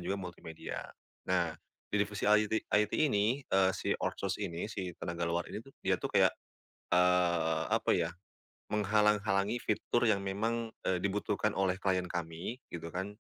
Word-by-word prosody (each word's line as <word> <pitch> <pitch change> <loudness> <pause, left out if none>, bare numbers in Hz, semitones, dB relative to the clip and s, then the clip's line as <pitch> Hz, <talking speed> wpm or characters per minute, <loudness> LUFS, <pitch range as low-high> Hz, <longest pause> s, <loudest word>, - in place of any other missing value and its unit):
juga 100 - -2
multimedia, 85 -3 -6 0.5
nah 85 -3 +2 0.4
di 105 - +2
divisi 105 -1 -1
IT 105 +1 +3
IT 105 0 +3
ini, 120 -5 +3
eee, 95 0 +3
si - - 0
outsource - - -2
ini 85 +1 -3
si 100 -4 -4
tenaga 85 0 -3
luar 85 +1 0
ini 105 - -4
tuh 135 +3 -17
dia - - +2
tuh - - -2
kayak - - +6 0.6
eee, 85 -3 +3
apa - - +2
ya, 85 -1 +1 0.6
menghalang-halangi 105 0 +2
fitur 120 0 +1
yang 105 -3 +3
memang, 115 +4 -1 0.2
eee, 90 -2 +1
dibutuhkan 105 +2 0
oleh 95 0 +1
klien 95 -2 +1
kami 85 +7 -4
gitu 85 -1 -7
kan, 95 +3 -4
95 Hz, 155 wpm, -32 LUFS, 90-105 Hz, 0.6 s, kayak